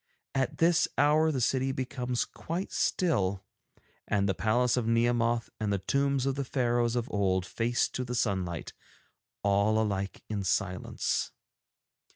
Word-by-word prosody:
At 135 -1 -1
this 165 0 +4
hour 155 +2 +4
the 135 - -1
city 130 +2 +1
becomes 125 -2 -2
quite 175 +4 -5
still, 100 - +1 0.6
and 100 -1 +1
the 95 - +2
palace 120 +4 +2
of 120 -3 -1
Nehemoth 115 0 +1
and 105 -2 -1
the 100 - +2
tombs 140 +6 0
of 135 - +1
the 140 +1 -2
Pharaohs 120 -2 +1
of 120 0 -1
old 95 -2 +1
face 120 +4 0
to 130 - -3
the 125 0 -4
sunlight, 95 -7 -1 0.7
all 100 +2 +3
alike 100 -3 -2
in 105 -2 -3
silence. 90 -1 -1
120 Hz, 145 wpm, -29 LUFS, 100-130 Hz, 0.7 s, this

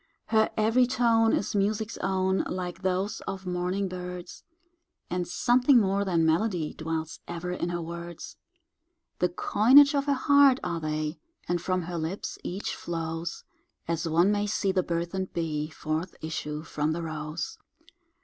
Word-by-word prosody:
Her 220 -1 +4
every 225 +4 +4
tone 230 -3 +3
is - - 0
music's 210 +2 0
own, 190 0 +1
Like 180 -1 -4
those 190 +3 -1
of 190 -1 -5
morning 180 +2 -1
birds, 180 -1 -7 0.7
And 180 -1 -1
something 245 +7 +4
more 200 -1 +1
than 170 -4 +2
melody 165 -1 +1
Dwells 160 0 -4
ever 175 +1 -4
in 175 -1 -2
her 175 -1 -2
words; 170 0 -7 0.8
The 180 - +2
coinage 260 - +6
of 280 -1 +1
her 285 - +2
heart 280 -1 +5
are 170 -1 -2
they, 155 0 -3 0.3
And 175 -1 0
from 185 0 0
her 170 0 -4
lips 160 +5 -4
each 190 +3 -3
flows 165 0 -4 0.4
As 165 0 -1
one 170 +5 +4
may 205 0 0
see 200 -1 +1
the 185 - +2
burden'd 175 +2 -3
bee 155 -3 -2
Forth 160 +3 -3
issue 150 -1 -4
from 155 0 -1
the 170 +1 -3
rose. 155 0 -5
180 Hz, 150 wpm, -28 LUFS, 165-205 Hz, 0.8 s, coinage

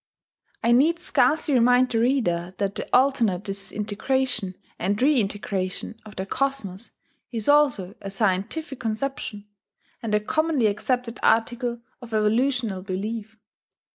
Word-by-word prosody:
I 235 - +3
need 295 +8 +4
scarcely 310 -3 +2
remind 250 +1 +5
the 225 - +1
reader 190 -8 +1
that 200 -1 -1
the - - -5
alternate 245 -8 +3
disintegration 210 +2 -2 0.2
and 200 +3 0
reintegration 205 -8 0
of 210 - -12
the 190 - -3
cosmos 235 -4 -2 0.4
is 225 -3 -4
also 275 -11 +3
a 195 - -5
scientific 210 - -1
conception, 220 -2 -3 0.6
and 220 -3 0
a - - +4
commonly 310 +2 +1
accepted 230 +3 -1
article 235 +1 +1 0.2
of 230 -2 -6
evolutional 225 -1 +1
belief. 210 +3 -4
225 Hz, 120 wpm, -25 LUFS, 200-260 Hz, 0.6 s, remind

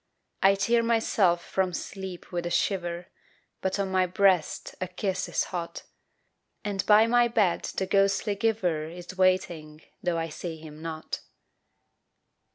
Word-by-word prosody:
I 195 +1 +6
tear 230 +5 +2
myself 220 -6 +2
from 185 -2 0
sleep 190 0 -6
with 175 -1 -2
a - - -2
shiver 175 -2 -1 0.5
But 190 +1 0
on 195 -1 -1
my 185 -1 +3
breast 185 -3 +2
a 185 - -1
kiss 185 +1 -2
is - - +1
hot, 170 -2 -4 0.8
And 200 -2 -1
by 215 +1 +7
my 240 +1 +4
bed 210 -7 +1
the 190 - +1
ghostly 195 +2 +2
giver 195 -8 0
Is 175 +2 -9
waiting 170 -5 0 0.2
tho' 175 -2 0
I 165 0 -2
see 165 +1 -6
him 155 -1 -11
not. 160 -1 -5
185 Hz, 145 wpm, -27 LUFS, 170-200 Hz, 0.8 s, by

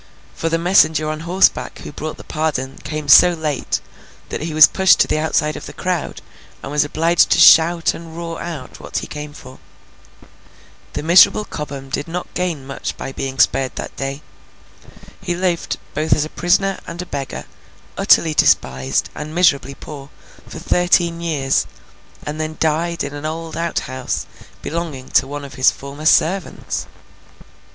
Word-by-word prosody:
For, 165 - -2
the 165 - +1
messenger 160 -3 +3
on 155 - -5
horseback 175 +4 +1
who - - -8
brought 155 +2 -6
the - - -11
pardon, 140 -4 -3
came 155 -1 -5
so 175 +5 +8
late, 155 -5 -2 0.5
that - - -4
he 160 +1 -3
was 155 0 +9
pushed 190 -1 +4
to - - +3
the 155 - 0
outside 155 -1 0
of - - -8
the - - -9
crowd, 180 -3 -3 0.4
and 135 - -6
was 150 0 +2
obliged 165 +3 +2
to - - +3
shout 165 +1 +6
and 165 -1 -10
roar 165 -1 -5
out 160 -7 -7
what - - -6
he - - -2
came 150 0 -7
for. 130 -3 -13 1.3
The - - -4
miserable 175 +5 +6
Cobham 140 -5 -7
did 145 +3 -3
not 175 +2 -6
gain 170 -7 -2
much 135 0 -5
by - - -6
being 135 0 -5
spared 130 0 +2
that - - -6
day. 135 +2 -5 1.0
He 180 -3 -2
lived, 175 -1 -1 0.2
both 155 +2 +1
as 150 - +1
a - - -8
prisoner 195 +3 +1
and 170 +1 -7
a - - -12
beggar, 140 -5 -5 0.5
utterly 160 -2 +4
despised, 65 - +1
and 155 +2 -7
miserably 140 -6 +2
poor, 140 -2 -10 0.4
for - - -9
thirteen 175 -1 +1
years, 145 -5 0 0.6
and 150 +2 -4
then 155 0 -4
died 165 +2 0
in 140 - -5
an 145 +1 -5
old 160 0 -6
outhouse 130 -6 -3 0.4
belonging 155 -5 -5
to 135 - +3
one 145 +1 -6
of 140 - -11
his 130 +1 +4
former 140 +3 -5
servants. 180 +3 +1
155 Hz, 165 wpm, -19 LUFS, 140-170 Hz, 1.3 s, was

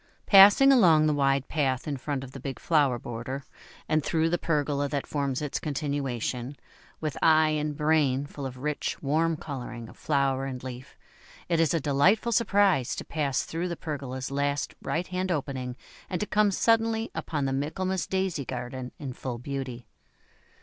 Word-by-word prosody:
Passing 205 +7 +8
along 170 - +6
the 155 - +3
wide 135 -1 +1
path 135 -4 -1
in 145 - -1
front 135 0 -3
of 130 - -9
the 135 - -9
big 135 -1 -5
flower 145 -6 +2
border, 120 +4 -6 0.4
and 155 -1 +1
through 165 +1 +1
the 175 - +1
pergola 145 -3 0
that 140 -2 -2
forms 140 -1 -2
its 145 - -2
continuation, 135 -3 -3 0.4
with 155 -3 -3
eye 155 -1 +5
and 150 -1 -2
brain 150 -3 +2
full 145 -1 -6
of 130 -1 -9
rich, 150 +3 -3
warm 160 +3 +1
colouring 125 -7 -7
of - - -14
flower 135 -2 0
and 130 -2 -6
leaf, 130 +1 -9 0.5
it 170 -2 +2
is 165 -2 +3
a - - +2
delightful 160 - +2
surprise 200 - +3
to - - -6
pass 140 -4 -1
through 170 +2 -3
the 170 -2 -4
pergola's 135 -4 -5
last 140 +1 -1
right 170 +2 -2
hand 185 +1 -2
opening, 130 -5 -3 0.3
and 180 - -2
to 210 - -1
come 210 0 +3
suddenly 225 +2 +1
upon 145 -3 -2
the 135 - 0
Michaelmas 185 +7 -2
Daisy 190 -6 -1
garden 125 0 -5
in 135 -3 -6
full 125 -1 -5
beauty. 130 -1 -5
145 Hz, 170 wpm, -27 LUFS, 135-165 Hz, 0.5 s, Passing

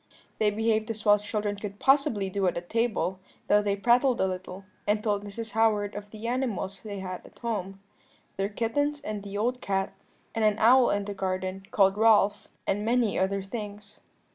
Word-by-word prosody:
"They 215 - +4
behaved 220 +1 0
as 220 0 -3
well 205 - +7
as 205 0 +1
children 210 -1 -2
could 200 0 -6
possibly 265 -7 +3
do 195 -1 +1
at 175 0 -2
table, 225 -5 0 0.3
though 210 - +5
they 200 -1 0
prattled 245 +5 +3
a - - +3
little, 185 +1 -5 0.2
and 210 +1 +1
told 205 -2 0
Mrs. 220 +2 -6
Howard 215 -2 +2
of 205 0 -7
the 215 +1 -9
animals 225 -7 -2
they 200 -3 -6
had 185 -1 -6
at - - -17
home, 195 -5 -4 0.6
their 195 +1 -1
kittens 285 +8 -1
and 210 -1 -4
the 200 0 -6
old 245 +4 0
cat, 195 0 -1 0.4
and 225 - -1
an 215 -1 +3
owl 245 +3 +6
in 205 0 0
the 205 - -4
garden 190 0 -3
called 195 -1 +3
Ralph, 210 -2 +4 0.2
and 205 +2 0
many 235 -1 +2
other 195 +1 0
things. 210 0 -7
205 Hz, 190 wpm, -28 LUFS, 195-225 Hz, 0.6 s, well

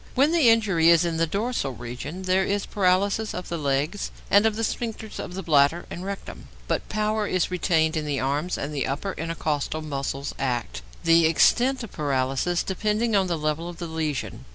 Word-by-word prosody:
When 275 +4 +4
the 325 -8 +5
injury 195 -8 +4
is 170 0 +5
in 165 -1 -1
the 165 0 +2
dorsal 200 - -2
region, 125 +9 -7
there 185 +1 +2
is 200 +1 -1
paralysis 200 +2 +1
of 180 - -6
the 170 - -2
legs 145 +7 -1 0.2
and 205 +2 +6
of 220 - -1
the 225 - -2
sphincters 225 -1 -4
of 180 - -6
the 190 - -4
bladder 150 +1 +3
and 175 - -6
rectum, 200 0 -7 0.2
but - - -2
power 215 0 0
is 185 -1 0
retained 160 -3 +1
in 155 -1 -2
the 140 -2 -1
arms 145 +7 -1
and 145 +2 -4
the 140 - -1
upper 170 +8 -3
intercostal 155 -2 -2
muscles 140 -1 -4
act, 125 -4 -2 0.2
the 165 -1 +5
extent 245 +10 +3
of 225 - -8
paralysis 140 +3 0
depending 215 +3 0
on 190 -2 +3
the 170 -2 -1
level 155 +2 -2
of 175 - -9
the 175 - -5
lesion. 160 -3 -3
170 Hz, 195 wpm, -25 LUFS, 150-205 Hz, 0.2 s, and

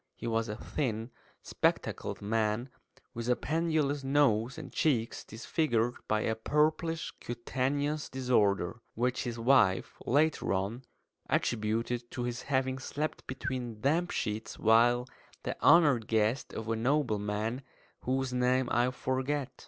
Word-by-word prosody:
He - - -8
was 115 -1 0
a 105 - -3
thin, 115 -2 -3 0.3
spectacled - - -1
man, 110 +3 0 0.4
with 115 0 -4
a 125 - +4
pendulous 155 -2 0
nose 135 -4 +2
and - - -8
cheeks 120 -7 0
disfigured 120 0 0
by 110 0 +1
a 110 - 0
purplish 155 +7 0
cutaneous 140 +5 -2
disorder 110 -5 +1
(which 125 +3 0
his 120 -1 -3
wife, 115 -6 +3
later 150 -3 +2
on, 100 +7 -2 0.4
attributed 115 +2 0
to 125 - -4
his 120 0 -3
having 130 -1 0
slept 150 +3 -4
between 130 -4 -4
damp 165 +6 +2
sheets 105 +1 -3
while 120 +2 +4 0.4
the - - -3
honoured 145 -10 +5
guest 110 +4 +1
of 110 - -6
a 115 - 0
nobleman, 110 -2 0 0.4
whose 130 0 -1
name 125 0 +2
I 120 +1 +3
forget). 130 +2 -2
125 Hz, 130 wpm, -31 LUFS, 115-140 Hz, 0.4 s, honoured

